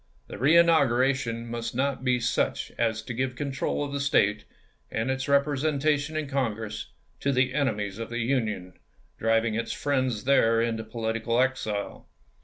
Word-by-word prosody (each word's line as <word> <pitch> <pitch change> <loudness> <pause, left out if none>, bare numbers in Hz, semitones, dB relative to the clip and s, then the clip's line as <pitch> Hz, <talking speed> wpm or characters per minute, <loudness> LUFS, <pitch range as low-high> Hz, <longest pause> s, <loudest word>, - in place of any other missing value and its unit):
The - - -8
reinauguration 135 -6 +3
must 115 0 -5
not 135 0 -1
be 125 -1 +2
such 115 - -1
as 110 -2 0
to 120 - -5
give 130 +1 -2
control 140 +1 -2
of 145 - -4
the 140 - -1
State, 105 -7 +2 0.4
and 115 +4 -1
its 130 +1 -3
representation 145 +1 +1
in 155 -2 -2
Congress, 115 -6 -2 0.3
to 140 - 0
the 130 -1 +2
enemies 105 -8 -1
of 115 - -5
the 120 - -4
Union, 110 -7 -1 0.5
driving 115 0 +2
its 115 +2 -2
friends 130 -6 -1
there 115 -4 +4
into 115 -1 -1
pohtical 115 +1 -1
exile. 125 -6 -2
125 Hz, 150 wpm, -27 LUFS, 115-140 Hz, 0.5 s, there